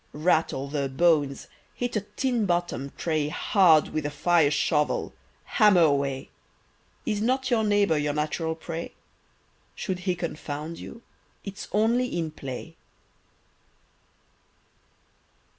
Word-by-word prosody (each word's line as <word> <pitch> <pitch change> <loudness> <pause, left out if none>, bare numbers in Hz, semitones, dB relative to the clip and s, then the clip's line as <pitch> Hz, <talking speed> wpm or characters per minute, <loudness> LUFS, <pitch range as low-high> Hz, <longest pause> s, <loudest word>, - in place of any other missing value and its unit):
Rattle 155 -3 +1
the 140 -1 -2
"bones," 145 -1 +2 0.3
hit 245 -1 -3
a 210 - +1
tinbottom'd 180 - -1
tray 155 -3 0
Hard 165 -2 +4
with 155 - -2
the - - 0
fireshovel, 150 -1 +1 0.3
hammer 210 -6 +4
away! 140 -3 +1 0.7
Is 210 -2 -1
not 260 +3 0
your 225 -2 +3
neighbour 205 -7 +3
your 145 0 0
natural 160 +2 -1
prey? 165 +1 -6 0.8
Should 185 -2 -3
he 180 - +2
confound 160 -2 -5
you, 230 - -10 0.4
it's 200 0 -7
only 235 +2 +1
in 165 -2 -2
play. 140 +3 -8
165 Hz, 110 wpm, -26 LUFS, 150-205 Hz, 0.8 s, Hard